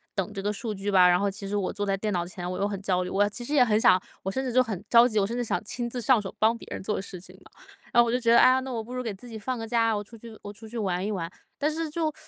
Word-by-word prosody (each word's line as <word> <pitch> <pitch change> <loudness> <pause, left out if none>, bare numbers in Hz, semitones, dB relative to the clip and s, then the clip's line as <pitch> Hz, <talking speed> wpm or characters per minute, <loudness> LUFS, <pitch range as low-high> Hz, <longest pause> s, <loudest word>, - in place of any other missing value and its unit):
等 195 0 -2
这 200 - -5
个 205 +1 -1
数 220 +1 -4
据 200 0 -4
吧， 185 -2 +6
然 175 - +4
后 200 +1 +1
其 195 +1 -7
实 205 +1 -2
我 195 -2 -2
坐 205 - -3
在 195 -1 0
电 210 +1 -2
脑 175 -1 -1
前 175 0 -6
我 180 - -4
又 200 - 0
很 200 -2 -3
焦 185 -2 0
虑， 180 - -5
我 205 +1 +2
其 225 +4 -7
实 290 - -4
也 255 -4 +6
很 215 -1 +2
想 185 0 +5 0.2
我 190 - -2
甚 265 - -2
至 250 - -3
就 255 - +5
很 210 -6 -5
着 235 0 +7
急， 220 -4 +1
我 195 - +1
甚 230 - -4
至 245 - -1
想 - - -1
亲 240 +2 -4
自 245 +1 -4
上 235 -1 +3
手 190 - -7
帮 225 +2 +3
别 - - -12
人 - - -5
做 205 0 -2
事 190 -2 -8
情 185 - -14
嘛。 - - -19 0.4
然 240 - +6
后 235 - +2
我 - - 0
就 - - +3
觉 230 -2 +2
得： 235 - +7
“哎 - - +7
呀， 260 0 +3
那 260 0 -6
我 230 -2 -2
不 240 +3 -9
如 250 0 -3
给 225 - -3
自 220 +6 -13
己 225 -2 -7
放 255 +4 -3
个 225 - -5
假， 225 -1 +2
我 205 - -1
出 220 +3 -12
去 225 0 -12
我 205 0 -7
出 220 +2 -13
去 235 - -7
玩 190 -3 -1
一 210 - -2
玩。” 170 -5 -3 0.3
但 295 - +1
是 320 0 -3
就 310 0 -1
215 Hz, 385 characters per minute, -26 LUFS, 195-240 Hz, 0.4 s, 着